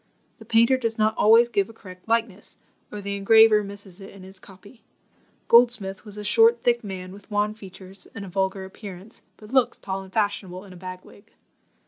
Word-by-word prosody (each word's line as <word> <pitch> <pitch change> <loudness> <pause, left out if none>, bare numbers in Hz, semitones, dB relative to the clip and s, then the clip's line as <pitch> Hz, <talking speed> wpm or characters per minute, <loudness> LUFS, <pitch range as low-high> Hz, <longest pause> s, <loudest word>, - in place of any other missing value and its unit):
The - - -13
painter 230 +3 +3
does 230 -3 -3
not 215 0 +1
always 230 +3 +5
give 205 -4 -1
a - - -12
correct 185 -4 -14
likeness, 225 -3 -2 0.3
or 210 - -7
the 200 0 -4
engraver 215 +1 +5
misses 200 -1 -10
it 195 - -10
in 195 -1 -14
his 190 +1 -11
copy. 200 +5 -15 0.7
Goldsmith 230 -5 +3
was 210 -1 -9
a 210 - -6
short 230 +2 +4
thick 240 -1 +1
man, 185 -2 -7
with 200 +2 -15
wan 210 0 0
features 190 -2 -12
and 200 -2 -7
a - - -10
vulgar 190 +1 -2
appearance, 195 +1 -11 0.2
but 215 +3 -14
looks 260 -3 +2
tall 195 -1 -5
and 190 -1 -13
fashionable 200 -3 -2
in 190 - -13
a - - -13
bag 185 0 -9
wig. 200 - -19
205 Hz, 195 wpm, -24 LUFS, 190-225 Hz, 0.7 s, always